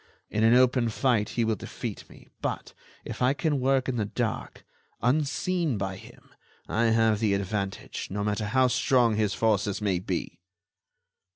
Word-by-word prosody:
In 110 - 0
an 115 +2 +6
open 125 -1 +4
fight 110 -2 +1
he 115 - +3
will 110 0 +1
defeat - - -7
me; - - -16
but - - -4 0.3
if - - -7
I 130 +3 +3
can 150 -2 0
work 130 0 +2
in 130 -2 -1
the 105 - 0
dark, 110 +2 -4 0.3
unseen 155 - 0
by 95 -1 -3
him, - - -15 0.3
I 115 +2 +1
have 110 -2 +3
the 105 -3 +2
advantage, 100 0 -3
no 100 +2 -3
matter 105 +1 -1
how 130 +5 +3
strong 125 -2 +3
his 105 -3 0
forces 105 -3 +1
may 100 -4 0
be." 90 -2 -4
110 Hz, 165 wpm, -27 LUFS, 105-125 Hz, 0.3 s, an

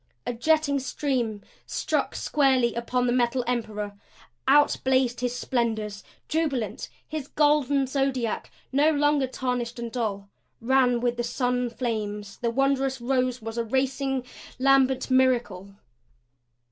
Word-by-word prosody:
A 245 - -2
jetting 285 +3 +2
stream 255 -6 -2 0.2
struck - - -1
squarely 265 -5 +2
upon 245 +1 -1
the 240 - +2
Metal 245 0 +1
Emperor. 215 -4 -3 0.5
Out 290 +2 +5
blazed 260 -2 +2
his 245 0 -1
splendors 220 -5 -2 0.2
jubilant. 295 -8 -1 0.2
His 305 -3 -5
golden 290 -2 +2
zodiac, 265 -4 -1 0.2
no 285 +3 +4
longer 290 -2 +2
tarnished 250 -2 -3
and 235 -1 -5
dull, 210 -5 -3 0.3
ran 250 0 +3
with 240 0 0
sun 245 0 0
flames; 210 -4 -4
the 235 - -1
wondrous 270 +1 +1
rose 255 -1 0
was 225 +1 -4
a - - +1
racing, 265 +2 -1 0.3
lambent 265 0 +3
miracle. 240 -7 +1
250 Hz, 120 wpm, -26 LUFS, 235-270 Hz, 0.5 s, Out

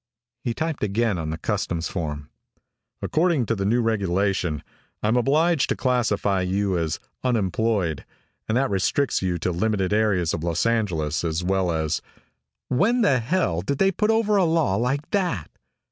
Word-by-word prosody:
He 120 -2 -2
typed 160 -5 -2
again 105 -1 +1
on 80 -1 -3
the 80 - -3
customs 85 +1 -2
form. 75 -5 -5 0.7
"According 160 -5 +2
to 110 -2 -1
a - - 0
new 120 +4 +2
regulation, 95 -6 0 0.4
I'm 110 +3 +2
obliged 150 +5 +2
to - - +1
classify 105 -6 +1
you 95 +1 0
as 80 -2 -1 0.2
unemployed, 105 - 0 0.5
and 110 - +2
that 135 -2 +1
restricts 100 +8 +1
you 90 -2 0
to 90 +2 -1
limited 95 +1 0
areas 105 -6 +2
of 80 - -3
Los 85 +2 0
Angeles 90 -11 0
as 80 +1 -1
well 95 -1 +1
as 80 -1 -1 0.4
" - - -59
"When 240 +5 +3
the 135 - +4
hell 115 - 0
did 135 +9 -2
they 195 +4 +3
put 210 +3 0
over 220 -2 +3
a 195 - +4
law 160 - +2
like 130 +7 -1
that?" 175 - -1
105 Hz, 165 wpm, -24 LUFS, 90-135 Hz, 0.7 s, the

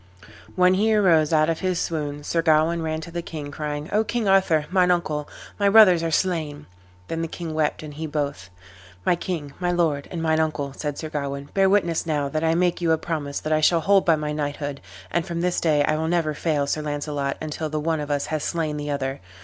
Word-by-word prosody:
When 180 0 +5
he 215 +3 +2
arose 165 -7 +4
out 155 -1 +4
of 165 -1 -1
his 185 -2 -1
swoon 145 -3 -3
Sir 165 +3 0
Gawain 165 +1 +3
ran 160 0 -2
to 170 - -9
the 170 0 -3
king, 150 -4 -7
crying, 150 0 -4
"O 215 +2 +3
King 230 -1 -2
Arthur, 190 -6 +3
mine 185 -1 +3
uncle, 155 -4 0 0.3
my 200 -1 +4
brothers 200 -5 +7
are 165 - -1
slain." 155 -4 -1 0.4
Then 165 0 -3
the 165 - -2
king 165 -1 -6
wept 155 0 -1
and 150 -1 -8
he 160 +2 -5
both. 140 - -3 0.6
"My - - +4
king, 160 -5 -5
my 180 -1 0
lord, 160 -5 0
and 175 - -5
mine 160 -1 +2
uncle," 150 -3 -1
said 145 0 -4
Sir 155 - -5
Gawain, 140 -1 -4
"bear 195 -1 +4
witness 175 -5 +1
now 145 -3 0
that 155 +3 -2
I 160 0 +2
make 175 0 +1
you 170 -1 +2
a 160 - +4
promise 155 -4 -3
that 155 - -1
I 155 - +2
shall 165 +2 +4
hold 195 +4 +4
by 165 - +4
my 150 -1 -3
knighthood, 145 -1 -3 0.3
and 170 - +1
from 170 0 -4
this 180 0 0
day 150 -3 +3
I 155 +1 +1
will 160 +1 -1
never 165 -2 +1
fail 150 -2 0
Sir 155 +2 -1
Launcelot 145 -1 -3
until 155 0 -4
the 155 0 -2
one 160 +1 -1
of 150 0 -5
us 145 -1 0
have 155 -1 -2
slain 155 -2 -2
the 145 0 -4
other. 135 -1 -2
155 Hz, 230 wpm, -24 LUFS, 150-170 Hz, 0.6 s, brothers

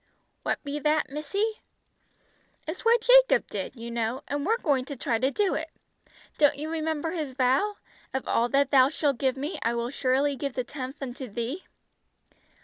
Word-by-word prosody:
"What - - 0
be 290 0 -3
that, 305 -1 +1
missy?" 400 +10 -2 1.1
"It's 320 +4 -5
what 460 0 +4
Jacob - - +6
did, - - -4
you 235 0 -7
know, 235 +2 -2
and 285 +3 -2
we're 450 +2 +3
going 280 - +1
to 285 - -6
try 235 -3 -1
to 260 +3 +2
do 395 +6 +1
it. 320 +1 -3 0.7
Don't 290 -1 +5
you 310 +2 -4
remember 320 0 -1
his 310 -6 -3
vow? 270 +11 +2 0.4
'Of 265 - -3
all 235 +1 +2
that 275 +1 +2
Thou 265 -1 +6
shalt 285 -4 0
give 265 -1 +1
me, 290 +6 -4
I 230 +1 0
will 235 +1 -2
surely 275 +1 +1
give 275 0 -4
the 255 - -1
tenth 270 +1 -7
unto 260 0 -6
Thee.'" 240 - -4
280 Hz, 180 wpm, -27 LUFS, 255-315 Hz, 1.1 s, Jacob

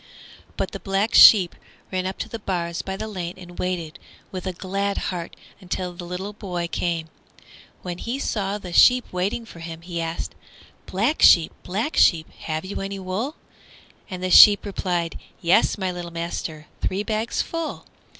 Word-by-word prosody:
But - - -2
the - - -6
Black 195 +3 -1
Sheep 190 -6 +8 0.4
ran 185 -1 -1
up 190 - -5
to - - -4
the 230 - -6
bars 170 -4 -2
by 190 0 -5
the 220 - -4
lane 180 -4 -5
and 175 -1 -12
waited 175 -4 -3 0.3
with 185 0 -5
a - - 0
glad 195 +2 -2
heart 175 -2 -4 0.3
till 180 -1 -3
the 175 0 -8
little 190 +4 -5
boy 180 -5 -4
came. 170 -1 -2 0.8
When 175 -1 -5
he 240 +3 -3
saw 205 -7 -2
the 180 -4 -9
sheep 250 +6 +6
waiting 195 +6 -1
for 170 - -13
him 165 0 -8
he 170 -1 -4
asked, 165 0 -4 0.5
"Black 225 +11 0
Sheep, 165 -2 +7
Black 220 - -3
Sheep, 160 -2 +4
have 155 +2 -4
you 195 - -5
any 195 0 -4
wool?" 195 - -3 0.7
And 185 -1 -6
the 185 - -1
sheep 205 +3 +9
replied, 180 -4 -2 0.2
"Yes 170 +5 +3
my 190 -2 -1
little 175 -1 -6
master, 165 -2 -5 0.2
three 195 +2 -1
bags 220 +1 -1
full!" 330 -1 -5
185 Hz, 170 wpm, -23 LUFS, 170-200 Hz, 0.8 s, sheep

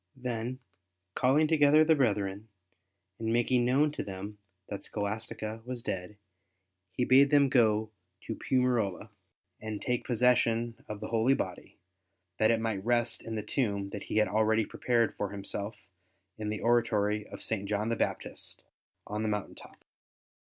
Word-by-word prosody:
Then, 125 0 -3 0.6
calling 140 +7 +3
together 155 0 +5
the 160 - +5
brethren, 105 -5 0 0.7
and 110 0 -1
making 120 +1 +2
known 140 +4 +3
to - - -4
them 100 +2 -7 0.3
that 100 -1 -6
Scholastica 110 +1 -4
was 125 -1 -6
dead, 95 +3 -4 0.7
he 125 - 0
bade 135 +3 +6
them 140 -2 +5
go 110 -4 +3 0.3
to - - -5
Piumarola 120 -6 0 0.5
and 110 -1 -4
take 125 -1 -1
possession 120 -1 +2
of 105 0 -6
the 110 - -5
holy 115 +4 +3
body, 90 -7 -5 0.6
that 110 - +4
it 115 - +3
might 110 -4 -2
rest 120 0 +1
in 115 - -6
the 105 - -3
tomb 100 -4 -1
that 100 - -5
he - - -2
had 110 - +4
already 110 +1 +2
prepared 120 0 +1
for 105 - -2
himself 100 +2 -5 0.6
in 105 -1 -4
the 105 - -3
oratory 105 -3 +1
of - - -10
St. 100 -3 -3
John 105 +1 0
the 115 - +1
Baptist - - -4 0.4
on 105 +1 -4
the 110 - 0
mountain 105 -2 -3
top. - - -15
110 Hz, 155 wpm, -30 LUFS, 105-125 Hz, 0.7 s, bade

